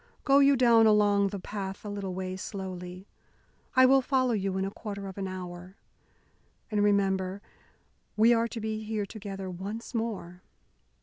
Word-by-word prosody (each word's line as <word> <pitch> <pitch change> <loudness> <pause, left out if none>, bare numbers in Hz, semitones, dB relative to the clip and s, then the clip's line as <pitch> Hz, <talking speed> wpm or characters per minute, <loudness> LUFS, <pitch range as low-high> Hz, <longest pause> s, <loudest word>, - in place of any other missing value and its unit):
Go 275 0 +5
you 280 0 +6
down 235 -3 +5
along 205 -1 +4
the 200 - -4
path 195 +1 -6
a - - -4
little 200 -3 -4
way 185 0 -4
slowly. 185 -1 -7 0.7
I 260 0 +7
will 270 +1 +6
follow 255 -1 +1
you 195 -3 -1
in 190 - 0
a 195 - -4
quarter 200 -2 -6
of 190 - -8
an 195 - -2
hour. 180 0 -8 1.0
And 210 -1 +2
remember 195 -2 +1 0.8
we 225 +3 +6
are 230 0 +2
to 230 - -6
be 220 0 -3
here 215 -1 -2
together 195 -2 -7
once 200 +7 -6
more!" 205 -6 -4
200 Hz, 165 wpm, -28 LUFS, 190-225 Hz, 1.0 s, I